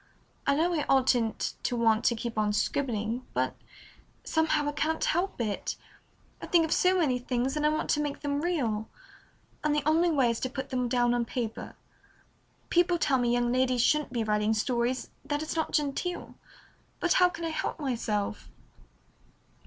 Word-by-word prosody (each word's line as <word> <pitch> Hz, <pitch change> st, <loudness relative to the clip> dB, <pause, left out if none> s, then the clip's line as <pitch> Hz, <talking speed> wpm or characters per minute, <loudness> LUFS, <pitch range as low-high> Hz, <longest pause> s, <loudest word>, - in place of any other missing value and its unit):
"I 280 Hz, -, +4 dB
know 340 Hz, +4 st, +2 dB
I 305 Hz, -3 st, 0 dB
oughtn't 250 Hz, -4 st, +2 dB
to 245 Hz, -, -1 dB
want 225 Hz, -2 st, +2 dB
to 235 Hz, -, +3 dB
keep 230 Hz, +1 st, -5 dB
on 210 Hz, -1 st, +1 dB
scribbling, 230 Hz, 0 st, -1 dB
but -, -, 0 dB, 0.7 s
somehow 320 Hz, -2 st, +1 dB
I -, -, +1 dB
can't 310 Hz, +2 st, -1 dB
help 355 Hz, 0 st, 0 dB
it. 215 Hz, -4 st, -2 dB, 0.7 s
I -, -, -6 dB
think 335 Hz, -2 st, +4 dB
of 320 Hz, -, -6 dB
so 370 Hz, +1 st, +3 dB
many 270 Hz, -8 st, +2 dB
things, 250 Hz, +2 st, -1 dB
and 300 Hz, 0 st, +2 dB
I -, -, +4 dB
want 310 Hz, 0 st, -1 dB
to 295 Hz, -, +2 dB
make 290 Hz, -1 st, -3 dB
them 285 Hz, 0 st, -1 dB
real, 245 Hz, -11 st, -1 dB, 0.7 s
and 300 Hz, -1 st, +2 dB
the 295 Hz, -, 0 dB
only 330 Hz, +3 st, +4 dB
way 270 Hz, -7 st, +3 dB
is 230 Hz, -, -3 dB
to 255 Hz, -, -2 dB
put 265 Hz, +1 st, -5 dB
them 250 Hz, -1 st, 0 dB
down 240 Hz, -1 st, +2 dB
on 240 Hz, -1 st, +1 dB
paper. 230 Hz, -1 st, -5 dB, 1.0 s
People 350 Hz, 0 st, +3 dB
tell 275 Hz, -5 st, +2 dB
me 240 Hz, -1 st, +1 dB
young 240 Hz, 0 st, +1 dB
ladies 255 Hz, -1 st, +2 dB
shouldn't 300 Hz, -2 st, +2 dB
be 235 Hz, -3 st, -1 dB
writing 210 Hz, 0 st, +1 dB
stories, 240 Hz, +3 st, -1 dB
that 290 Hz, +1 st, -2 dB
it's 315 Hz, -, -4 dB
not 320 Hz, -1 st, -1 dB
genteel, 300 Hz, +4 st, -2 dB, 0.7 s
but 350 Hz, -, +2 dB
how 360 Hz, -, +7 dB
can 335 Hz, -1 st, -6 dB
I -, -, -1 dB
help 320 Hz, -, -3 dB
myself?" 225 Hz, -7 st, -2 dB
265 Hz, 180 wpm, -28 LUFS, 235-310 Hz, 1.0 s, how